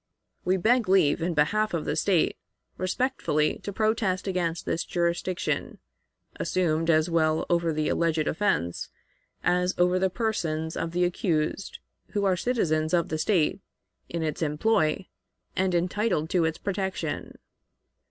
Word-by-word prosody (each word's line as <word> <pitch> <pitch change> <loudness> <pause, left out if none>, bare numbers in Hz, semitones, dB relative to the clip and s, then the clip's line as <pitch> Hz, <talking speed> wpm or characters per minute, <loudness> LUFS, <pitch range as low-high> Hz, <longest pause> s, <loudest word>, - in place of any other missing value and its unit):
We 185 +1 +2
beg 230 +2 +2
leave, 175 -4 +4
in 170 0 -1
behalf 205 +7 +2
of 160 - -2
the - - -1
State, 170 +1 +2 0.4
respectfully 185 - 0
to 205 - -5
protest 210 -3 0
against 175 -3 -1
this 165 - -1
jurisdiction, 175 +1 -1 0.6
assumed 165 -2 0
as 155 -1 +4
well 160 -2 +1
over 170 -1 +2
the 155 0 -1
alleged 165 -2 +1
offense 120 - 0 0.5
as 180 +1 +2
over 180 +1 +3
the 190 0 +2
persons 165 -8 -2
of 165 - -3
the 180 +1 +2
accused, 175 0 -1 0.4
who 205 -1 +1
are 190 -1 +3
citizens 170 -7 +1
of 170 -2 +1
the 155 - -2
State, 175 -1 +2 0.5
in 170 -1 -2
its 155 0 -3
employ, 160 +3 +1 0.5
and 185 -1 +1
entitled 180 -2 0
to 175 -3 +3
its 160 0 -1
protection. 190 -6 -3
175 Hz, 140 wpm, -27 LUFS, 160-190 Hz, 0.6 s, leave